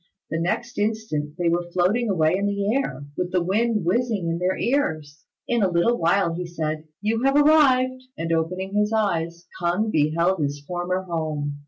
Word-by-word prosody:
The 160 Hz, -, -1 dB
next 230 Hz, +8 st, -2 dB
instant 205 Hz, -9 st, -2 dB
they 175 Hz, -2 st, 0 dB
were 175 Hz, +1 st, 0 dB
floating 205 Hz, +6 st, +2 dB
away 160 Hz, -3 st, +2 dB
in 200 Hz, +1 st, 0 dB
the 200 Hz, +1 st, 0 dB
air, 145 Hz, -, -2 dB
with 180 Hz, +1 st, -2 dB
the 180 Hz, -2 st, +1 dB
wind 215 Hz, +1 st, +1 dB
whizzing 210 Hz, -2 st, 0 dB
in 165 Hz, +1 st, -2 dB
their 185 Hz, +1 st, 0 dB
ears. 155 Hz, -, -1 dB, 0.2 s
In 240 Hz, -1 st, +1 dB
a 195 Hz, -, +3 dB
little 175 Hz, +7 st, +2 dB
while 170 Hz, +1 st, +2 dB
he 175 Hz, +1 st, -4 dB
said, 155 Hz, -2 st, -3 dB, 0.2 s
"You 225 Hz, +2 st, 0 dB
have 275 Hz, +1 st, +2 dB
arrived," 265 Hz, -4 st, +4 dB, 0.2 s
and 165 Hz, 0 st, -3 dB
opening 180 Hz, +4 st, -2 dB
his 210 Hz, +1 st, +1 dB
eyes, 170 Hz, -6 st, -1 dB, 0.2 s
K'ung 180 Hz, +6 st, +1 dB
beheld 165 Hz, +3 st, +2 dB
his 145 Hz, 0 st, -2 dB
former 180 Hz, +2 st, -2 dB
home. 155 Hz, -4 st, -3 dB
180 Hz, 180 wpm, -23 LUFS, 165-220 Hz, 0.2 s, arrived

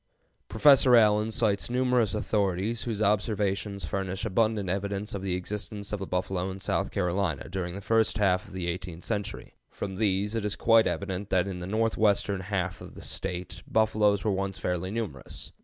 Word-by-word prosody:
Professor 130 Hz, +2 st, +6 dB
Allen 105 Hz, -1 st, +4 dB
cites 110 Hz, -2 st, +1 dB
numerous 125 Hz, -4 st, +2 dB
authorities, 105 Hz, +1 st, 0 dB
whose 110 Hz, -3 st, -1 dB
observations 100 Hz, -2 st, 0 dB
furnish 95 Hz, +3 st, -3 dB
abundant 110 Hz, -1 st, +1 dB
evidence 100 Hz, +3 st, -2 dB
of 100 Hz, -, -4 dB
the 95 Hz, -2 st, -1 dB
existence 100 Hz, +2 st, -4 dB
of 105 Hz, -, -1 dB
the 95 Hz, -, -5 dB
buffalo 90 Hz, 0 st, -1 dB
in 95 Hz, +1 st, -6 dB
South -, -, -1 dB
Carolina 90 Hz, -4 st, -1 dB
during 90 Hz, 0 st, -4 dB
the 100 Hz, -, -6 dB
first 110 Hz, +1 st, +2 dB
half 95 Hz, -3 st, +2 dB
of 100 Hz, -, -14 dB
the 90 Hz, -2 st, -3 dB
eighteenth 85 Hz, -1 st, -5 dB
century. 105 Hz, -1 st, -4 dB, 0.2 s
From 95 Hz, -2 st, -5 dB
these 105 Hz, 0 st, +1 dB
it 115 Hz, -2 st, -1 dB
is 105 Hz, -1 st, -1 dB
quite 115 Hz, -1 st, +4 dB
evident 100 Hz, 0 st, -3 dB
that 95 Hz, -1 st, +2 dB
in 95 Hz, -2 st, -4 dB
the 90 Hz, -, -5 dB
northwestern 105 Hz, -2 st, +1 dB
half 95 Hz, -2 st, -2 dB
of -, -, -10 dB
the -, -, -10 dB
State 90 Hz, 0 st, -4 dB
buffaloes 105 Hz, -2 st, +2 dB
were 110 Hz, -, +1 dB
once 95 Hz, 0 st, -2 dB
fairly 90 Hz, 0 st, -2 dB
numerous. 100 Hz, -, -5 dB
100 Hz, 175 wpm, -28 LUFS, 95-110 Hz, 0.2 s, Professor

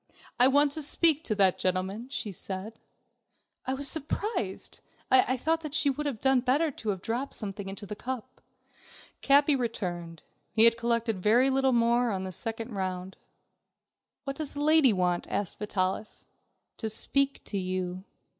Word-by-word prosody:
"I 250 Hz, -, +8 dB
want 285 Hz, +2 st, +4 dB
to 310 Hz, -, -4 dB
speak 315 Hz, +1 st, +3 dB
to 215 Hz, -, 0 dB
that 195 Hz, -3 st, +3 dB
gentleman," 190 Hz, +6 st, -2 dB
she 240 Hz, -6 st, -4 dB
said. 195 Hz, +4 st, -7 dB, 0.9 s
I 260 Hz, -, 0 dB
was 280 Hz, +1 st, -1 dB
surprised, 300 Hz, -, -2 dB, 0.3 s
I 255 Hz, 0 st, +4 dB
thought 315 Hz, +2 st, -1 dB
she 290 Hz, -2 st, +3 dB
would 295 Hz, +2 st, -4 dB
have 255 Hz, -7 st, -4 dB
done 265 Hz, +1 st, +3 dB
better 275 Hz, +6 st, +1 dB
to 225 Hz, -4 st, -6 dB
have 190 Hz, -2 st, -3 dB
dropped 245 Hz, +5 st, -3 dB
something 200 Hz, -2 st, -6 dB
into 195 Hz, +1 st, -7 dB
the 210 Hz, -, -6 dB
cup. 250 Hz, +1 st, -7 dB, 0.8 s
Capi 285 Hz, +1 st, +4 dB
returned. 175 Hz, -, -4 dB, 0.3 s
He 220 Hz, -, +5 dB
had 230 Hz, 0 st, +7 dB
collected 230 Hz, -3 st, -1 dB
very 240 Hz, +7 st, +4 dB
little 265 Hz, 0 st, +2 dB
more 235 Hz, 0 st, +2 dB
on 190 Hz, -3 st, -2 dB
this 185 Hz, -2 st, -5 dB
second 225 Hz, +1 st, -3 dB
round. 185 Hz, -1 st, -4 dB, 1.1 s
"What 275 Hz, -1 st, -5 dB
does 305 Hz, -3 st, -4 dB
the 290 Hz, -, -2 dB
lady 310 Hz, -4 st, +5 dB
want?" 180 Hz, -3 st, 0 dB
asked 200 Hz, -4 st, -3 dB
Vitalis. 200 Hz, 0 st, -3 dB, 0.5 s
"To 220 Hz, -, -3 dB
speak 275 Hz, +5 st, +2 dB
to 200 Hz, -, -4 dB
you." 185 Hz, 0 st, -3 dB
230 Hz, 160 wpm, -28 LUFS, 195-275 Hz, 1.1 s, I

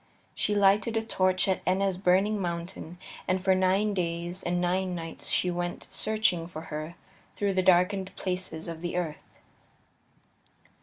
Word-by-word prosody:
She 210 Hz, -, 0 dB
lighted 205 Hz, +3 st, +4 dB
a 225 Hz, -, 0 dB
torch 185 Hz, -4 st, +2 dB
at 190 Hz, -, +1 dB
Etna's 190 Hz, +1 st, +1 dB
burning 195 Hz, +3 st, +2 dB
mountain, 170 Hz, -1 st, -4 dB, 0.3 s
and 185 Hz, 0 st, +2 dB
for 190 Hz, +1 st, +3 dB
nine 190 Hz, +3 st, +2 dB
days 175 Hz, 0 st, -2 dB
and 175 Hz, 0 st, 0 dB
nine 180 Hz, +1 st, 0 dB
nights 165 Hz, -1 st, -5 dB
she 180 Hz, -, +2 dB
went 175 Hz, 0 st, -3 dB
searching 215 Hz, -6 st, +1 dB
for 160 Hz, -2 st, -7 dB
her 155 Hz, +3 st, -4 dB, 0.4 s
through 200 Hz, -1 st, 0 dB
the 185 Hz, -, +2 dB
darkened 185 Hz, +1 st, +3 dB
places 180 Hz, -4 st, -3 dB
of 165 Hz, -1 st, -6 dB
the 175 Hz, 0 st, -2 dB
earth. 160 Hz, -4 st, -5 dB
185 Hz, 150 wpm, -28 LUFS, 175-195 Hz, 0.4 s, lighted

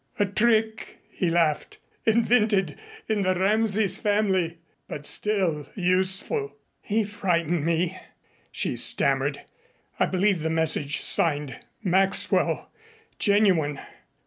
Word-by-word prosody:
"A 205 Hz, -, +2 dB
trick," 220 Hz, +2 st, 0 dB
he 180 Hz, -, -1 dB
laughed, 165 Hz, -3 st, 0 dB, 0.3 s
"invented 215 Hz, -6 st, +2 dB, 0.3 s
in 215 Hz, -2 st, 0 dB
the 185 Hz, -1 st, +1 dB
Rameses 210 Hz, +1 st, +1 dB
family 190 Hz, -5 st, 0 dB, 0.3 s
but 145 Hz, -, -7 dB
still 180 Hz, -7 st, 0 dB
useful." 190 Hz, -, 0 dB, 0.3 s
"He 220 Hz, +1 st, -1 dB
frightened 175 Hz, -6 st, -1 dB
me," 170 Hz, +3 st, -1 dB, 0.5 s
she -, -, -2 dB
stammered. -, -, +2 dB, 0.6 s
"I -, -, +2 dB
believed 190 Hz, -1 st, 0 dB
the 160 Hz, -, -2 dB
message 160 Hz, -3 st, +1 dB
signed 145 Hz, -5 st, +1 dB, 0.2 s
'Maxwell' 190 Hz, 0 st, +1 dB, 0.5 s
genuine." 185 Hz, -9 st, +2 dB
190 Hz, 100 wpm, -25 LUFS, 165-210 Hz, 0.6 s, A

